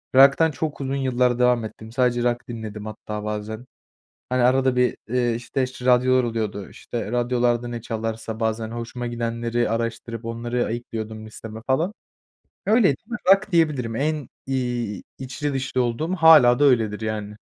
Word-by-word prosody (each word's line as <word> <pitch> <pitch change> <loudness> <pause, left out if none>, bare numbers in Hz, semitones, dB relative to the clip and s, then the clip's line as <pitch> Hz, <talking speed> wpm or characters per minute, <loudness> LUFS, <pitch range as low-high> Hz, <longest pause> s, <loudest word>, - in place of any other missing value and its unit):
Rock'tan 140 +4 +6
çok 145 0 -4
uzun 135 0 -2
yıllar 125 -2 +1
devam 125 -2 +3
ettim, 110 +1 -10
sadece 120 0 +1
rock 120 0 -1
dinledim 110 -3 -6
hatta 105 0 -6
bazen. 105 +2 -4 0.6
Hani, 125 -1 +2
arada 130 +1 +3
bir, 125 0 +2
eee, 120 0 +1
işte, 125 +3 -2
ş 125 -1 -10
radyolar 130 0 +4
oluyordu, 110 -4 -3
işte, 115 -2 -6
radyolarda 120 0 +1
ne 120 -1 -5
çalarsa 110 0 -4
bazen 110 0 -1
hoşuma 120 +1 -5
gidenleri 120 0 -1
araştırıp 115 0 -3
onları 120 +1 -2
ayıklıyordum 110 -2 -5
listeme 110 0 -9
falan, 160 +10 +1 0.7
öyleydi. 205 - +4 0.3
Rock, 195 +2 +5
diyebilirim. 150 -9 +1
En, 150 +1 -1 0.2
iii, 120 -6 -2 0.2
içli 140 +2 -3
dışlı 130 -1 -1
olduğum 155 +10 -1
hâlâ 155 -7 +7
da - - +4
öyledir 110 -5 +2
yani. 105 -1 -4
120 Hz, 150 wpm, -23 LUFS, 115-130 Hz, 0.7 s, hâlâ